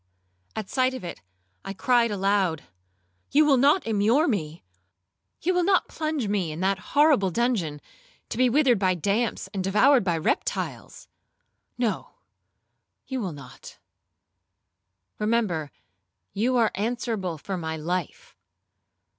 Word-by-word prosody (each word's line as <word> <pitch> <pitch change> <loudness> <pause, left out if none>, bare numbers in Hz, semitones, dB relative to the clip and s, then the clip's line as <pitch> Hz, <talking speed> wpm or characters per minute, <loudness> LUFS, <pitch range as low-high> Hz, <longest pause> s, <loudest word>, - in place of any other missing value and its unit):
At 215 -3 -4
sight 255 +3 +1
of 255 - -7
it 175 - -7 0.4
I 195 - -5
cried 240 +3 +2
aloud, 195 -5 0 0.7
'You 300 +2 +5
will 280 -3 +4
not 290 +8 +3
immure 225 +8 +2
me? 165 - -3 0.8
You 365 +3 +2
will 355 0 +2
not 380 +1 +2
plunge 310 -7 -2
me 195 -5 -1
in 155 - -6
that 190 0 +1 0.2
horrible 290 -10 +5
dungeon, 185 -8 -1 0.5
to - - -5
be 255 -1 +4
withered 255 -4 +3
by 185 -2 +2
damps, 200 +6 -1
and 190 -2 -2
devoured 225 +7 +4
by 175 -3 0
reptiles? 485 - -3 0.7
No, 235 -4 -2 0.9
you 260 -2 -4
will 185 -6 -3
not,—remember 145 - -7 0.6
you 245 +5 +1
are 225 -2 +3
answerable 215 -5 -2
for 190 +6 -5
my 160 -2 -4
life.' 175 +2 -4
205 Hz, 125 wpm, -25 LUFS, 180-255 Hz, 0.9 s, You